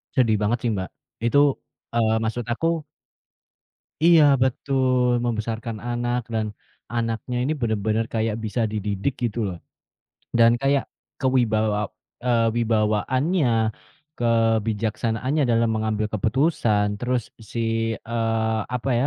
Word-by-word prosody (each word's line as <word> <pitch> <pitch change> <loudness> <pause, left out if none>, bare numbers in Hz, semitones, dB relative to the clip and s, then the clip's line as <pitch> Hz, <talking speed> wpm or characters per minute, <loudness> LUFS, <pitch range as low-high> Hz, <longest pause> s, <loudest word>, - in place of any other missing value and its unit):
Sedih 115 -5 +4
banget 110 +4 +2
sih - - +2
Mbak. 95 -1 -3 0.4
Itu, 120 +4 +2 0.6
eee, 115 -2 +2
maksud 115 +1 -2
aku 165 - -3 1.4
Iya 165 -3 +7 0.2
betul, 130 -1 +1 0.2
membesarkan 115 0 -3
anak 120 +1 -1
dan 110 -1 0 0.5
anaknya 115 +1 -2
ini 145 - 0
benar-benar 110 0 0
kayak 110 -1 0
bisa 115 +3 -1
dididik 105 +4 -2
gitu 120 0 -1
loh. 90 -3 -5 0.8
Dan 115 0 +7
kayak 140 0 +2 0.4
kewibawa 110 -5 +2 0.4
eee, 115 -2 +3
wibawaannya, 120 - +1 0.7
kebijaksanaannya 115 +3 +1
dalam 115 0 +3
mengambil 110 -1 0
keputusan. 110 - +1
Terus 125 +1 0 0.3
si, 115 -1 -1
eee, 115 -1 -1
apa 125 +2 -1
ya, 135 - +2
115 Hz, 110 wpm, -23 LUFS, 110-125 Hz, 1.4 s, Iya